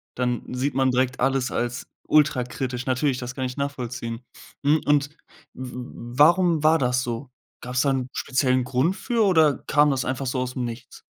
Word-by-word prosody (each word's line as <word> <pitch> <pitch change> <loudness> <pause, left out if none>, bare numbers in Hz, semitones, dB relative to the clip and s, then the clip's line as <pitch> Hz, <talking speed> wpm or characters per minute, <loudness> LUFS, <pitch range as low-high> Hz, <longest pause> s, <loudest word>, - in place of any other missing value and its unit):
dann 125 -1 -1
sieht 135 +3 -1
man 130 0 +2
direkt 125 0 0
alles 135 0 +1
als 120 +1 -3 0.2
ultrakritisch. 130 -3 +1
Natürlich, 130 +1 +1
das 125 0 -6
kann 130 - -2
ich 125 +1 -5
nachvollziehen. 125 -4 -4 0.4
Mhm. 150 +2 +3
Und 145 -1 +2 0.4
w 130 -1 -7
w - - -4 0.4
warum 170 +1 +4
war 160 +1 +5
das 125 0 +1
so? 120 +2 -5 0.3
Gab's 125 0 -1
da 140 - +2
'n 130 -2 -1
speziellen 130 -1 +1
Grund 130 +8 0
für 235 +1 0
oder 160 -7 +4
kam 150 -1 +4
das 135 -1 0
einfach 130 +1 -3
so 130 0 -1
aus 125 0 -3
'm 125 - -2
Nichts? 120 +1 -8
130 Hz, 185 wpm, -24 LUFS, 125-145 Hz, 0.4 s, war